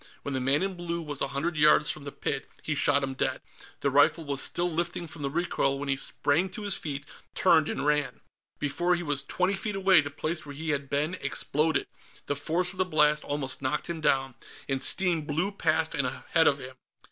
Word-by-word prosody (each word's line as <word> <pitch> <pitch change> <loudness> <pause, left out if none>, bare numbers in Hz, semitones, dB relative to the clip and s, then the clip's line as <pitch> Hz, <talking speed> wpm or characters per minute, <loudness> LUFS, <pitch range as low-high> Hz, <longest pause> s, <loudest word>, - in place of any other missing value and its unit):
When 140 - -3
the 130 - 0
man 135 +6 +2
in 195 0 -1
blue 170 -1 -4
was 145 -3 -5
a - - +1
hundred 140 +5 -2
yards 150 0 +5
from 150 -2 -8
the 140 - -5
pit, 135 0 -3
he 155 - -1
shot 140 -1 +3
him 135 0 -2
dead. 130 - -1 0.4
The 140 - +1
rifle 145 +4 +4
was 140 -1 -1
still 175 0 0
lifting 170 +1 -2
from 155 0 -10
the 140 - -1
recoil 140 -3 0
when 140 0 -5
he 135 - +3
sprang 145 +6 +1
to 210 +3 -7
his 200 -2 +3
feet, 145 -4 -4 0.3
turned, 160 -4 +4
and 140 - -2
ran. 150 -1 +1 0.4
Before 175 +5 +1
he 175 - -3
was 145 -3 0
twenty 180 +7 +1
feet 210 +1 -2
away, 190 -3 +5
the 145 - -5
place 155 +3 -3
where 145 -1 -9
he 160 +2 -2
had 140 -2 -2
been 150 +4 0
exploded; 155 +1 0 0.4
the 145 - -1
force 170 +5 0
of 190 - -10
the - - +5
blast 150 -3 +2
almost 140 -2 -3
knocked 150 +5 -1
him 165 -2 -5
down, 135 -3 +1 0.3
and 135 -1 -1
steam 180 -4 +2
blew 160 +6 -1
past 160 -4 +1
and 135 - 0
ahead 160 +5 +1
of 140 - +4
him. 130 -1 -10
150 Hz, 220 wpm, -28 LUFS, 140-170 Hz, 0.4 s, yards